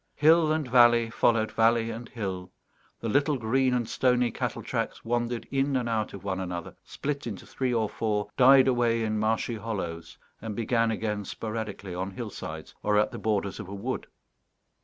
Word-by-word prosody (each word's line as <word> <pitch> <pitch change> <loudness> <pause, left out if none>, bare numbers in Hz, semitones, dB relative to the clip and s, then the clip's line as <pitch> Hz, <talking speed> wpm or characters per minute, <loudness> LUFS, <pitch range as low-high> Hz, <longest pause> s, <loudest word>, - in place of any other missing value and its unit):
Hill 160 +1 +5
and 155 -3 0
valley 120 -2 +5
followed 115 -1 +2
valley 115 0 +3
and 115 +1 -7
hill; 95 -5 -5 0.5
the 115 - -3
little 140 +5 +2
green 130 +3 +1
and 120 -2 -1
stony 125 -2 +2
cattle - - -3
tracks - - -3
wandered 120 0 -1
in 135 0 +1
and 125 -2 0
out 110 -3 -1
of 100 - -10
one 95 -1 -2
another, 90 -2 -5
split 145 -2 -4
into 100 -5 -6
three 130 -2 -2
or 115 -3 +1
four, 105 -1 -1
died 130 0 +7
away 120 -2 +2
in 110 -1 -1
marshy 110 +2 0
hollows, 95 -7 -5 0.2
and 110 -1 -5
began 115 0 +1
again 105 -2 -2
sporadically 105 -2 -5
on 95 +2 -3
hillsides 95 - -7
or 105 0 +2
at 105 - +2
the - - -7
borders 100 -2 -1
of 105 - -6
a 100 - -6
wood. 120 +6 -4
115 Hz, 180 wpm, -27 LUFS, 105-125 Hz, 0.5 s, died